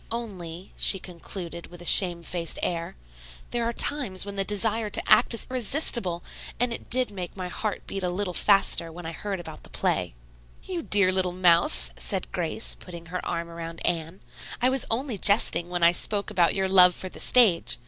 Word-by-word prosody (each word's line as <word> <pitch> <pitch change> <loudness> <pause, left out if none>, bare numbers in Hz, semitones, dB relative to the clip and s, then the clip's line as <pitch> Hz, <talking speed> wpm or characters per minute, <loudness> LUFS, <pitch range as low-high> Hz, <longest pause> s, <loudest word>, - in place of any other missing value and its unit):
"Only," 185 -7 -7
she - - +4
concluded 175 -1 -9
with 175 - -14
a 175 - -12
shame 175 -2 +4
faced 170 -1 -3
air, 170 -1 -3 0.6
"there 240 -1 -2
are 230 - -1
times 235 -7 +2
when 200 0 -8
the 195 - 0
desire 210 +2 0
to - - -1
act 235 - +4
is - - -3
irresistible, 235 - 0 0.4
and 245 0 0
it - - -7
did 255 -2 +4
make 185 -1 -8
my 180 -1 -6
heart 210 +3 -5
beat 195 - -6
a 180 - -2
little 180 0 -3
bit - - -2
faster 195 -4 +2
when 175 +1 -11
I 165 - -5
heard 195 +3 -6
about 175 - -10
the - - -15
play." - - -2 0.5
"You 365 -3 -4
dear 200 -9 +3
little 185 -1 +1
mouse," 170 - +3
said - - -3
Grace, - - -3
putting 165 - -11
her 180 - -4
arm 170 0 -4
around 165 0 -8
Anne. 165 +2 -3 0.4
"I 250 +1 +2
was 265 0 0
only 235 -2 -2
jesting 200 -4 +4
when 175 -1 -3
I 170 - +7
spoke 200 +3 -2
about 175 -2 +2
your 190 -1 -1
love 180 -1 +7
for 185 - -7
the - - -12
stage. 220 -9 +3
185 Hz, 200 wpm, -25 LUFS, 170-210 Hz, 0.6 s, I